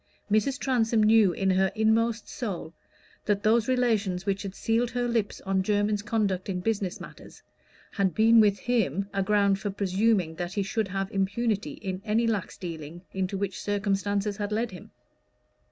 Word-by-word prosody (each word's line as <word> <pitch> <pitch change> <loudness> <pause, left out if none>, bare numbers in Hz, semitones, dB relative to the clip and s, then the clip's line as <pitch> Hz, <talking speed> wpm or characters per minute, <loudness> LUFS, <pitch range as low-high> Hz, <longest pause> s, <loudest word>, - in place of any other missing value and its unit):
Mrs. 215 +6 +2
Transome 230 -5 +1
knew 215 -3 +5
in 190 +2 0
her 190 0 +2
inmost 225 +1 +1
soul 200 - -5 0.5
that 205 -1 0
those 225 +1 +3
relations 220 -8 +1
which 200 -1 -1
had 195 -1 -6
sealed 230 +2 0
her 245 0 -1
lips 230 -4 -1
on 190 0 0
Jermyn's 205 +1 +1
conduct 205 -4 -1
in 185 -2 -2
business 200 -2 -2
matters, - - -12 0.5
had 195 -3 0
been 225 +1 +6
with 205 -2 +4
him 200 - 0
a 195 - 0
ground 200 0 +2
for 205 - -3
presuming 195 -2 +1
that 175 +1 -4
he 200 - 0
should 220 +1 -1
have 195 0 -3
impunity 200 -3 -1
in 190 -1 -5
any 220 +2 +1
lax 220 -4 -2
dealing 170 -2 -7
into 190 0 -2
which 195 -1 -3
circumstances 200 0 -1
had 205 0 -3
led 225 +1 -1
him. 180 - -11
205 Hz, 170 wpm, -27 LUFS, 190-225 Hz, 0.5 s, been